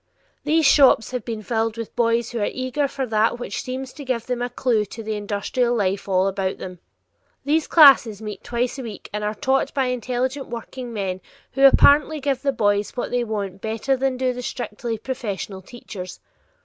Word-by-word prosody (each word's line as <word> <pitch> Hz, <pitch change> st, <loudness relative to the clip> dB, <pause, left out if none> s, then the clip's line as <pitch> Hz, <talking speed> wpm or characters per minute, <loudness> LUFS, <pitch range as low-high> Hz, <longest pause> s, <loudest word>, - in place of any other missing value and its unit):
These 315 Hz, +1 st, +3 dB
shops 270 Hz, -5 st, +5 dB
have 250 Hz, -3 st, -3 dB
been 220 Hz, -2 st, -5 dB
filled 225 Hz, 0 st, -1 dB
with 230 Hz, -1 st, -6 dB
boys 230 Hz, 0 st, +1 dB
who 235 Hz, -, -3 dB
are 205 Hz, -, 0 dB
eager 255 Hz, +3 st, -1 dB
for 270 Hz, -1 st, -3 dB
that 220 Hz, 0 st, +1 dB
which 240 Hz, -4 st, -4 dB
seems 255 Hz, 0 st, -6 dB
to 290 Hz, -, -9 dB
give 255 Hz, -4 st, -2 dB
them 250 Hz, -1 st, -3 dB
a 245 Hz, -, -1 dB
clew 240 Hz, -3 st, +1 dB
to 225 Hz, +3 st, -9 dB
the 220 Hz, 0 st, -3 dB
industrial 210 Hz, +4 st, -1 dB
life 200 Hz, -2 st, -1 dB
all 185 Hz, 0 st, +3 dB
about 195 Hz, -1 st, -2 dB
them. 180 Hz, -1 st, -8 dB, 0.7 s
These 305 Hz, +2 st, +1 dB
classes 270 Hz, -, +7 dB
meet 210 Hz, -2 st, -7 dB
twice 245 Hz, +3 st, -2 dB
a -, -, -3 dB
week 220 Hz, -5 st, -9 dB
and 210 Hz, 0 st, -3 dB
are 210 Hz, +1 st, -2 dB
taught 270 Hz, +1 st, +1 dB
by 270 Hz, -2 st, +2 dB
intelligent 255 Hz, +3 st, -2 dB
workingmen 230 Hz, -5 st, -5 dB, 0.3 s
who 275 Hz, 0 st, +6 dB
apparently 300 Hz, +3 st, +5 dB
give 270 Hz, -2 st, -1 dB
the 280 Hz, -, +1 dB
boys 205 Hz, -2 st, 0 dB
what -, -, -3 dB
they 245 Hz, 0 st, +1 dB
want 200 Hz, -4 st, -4 dB
better 225 Hz, +5 st, 0 dB
than 265 Hz, 0 st, -1 dB
do 255 Hz, 0 st, 0 dB
the 250 Hz, -, -6 dB
strictly 235 Hz, -2 st, -4 dB
professional 210 Hz, -5 st, -5 dB
teachers. 190 Hz, -3 st, -9 dB
235 Hz, 190 wpm, -22 LUFS, 210-260 Hz, 0.7 s, classes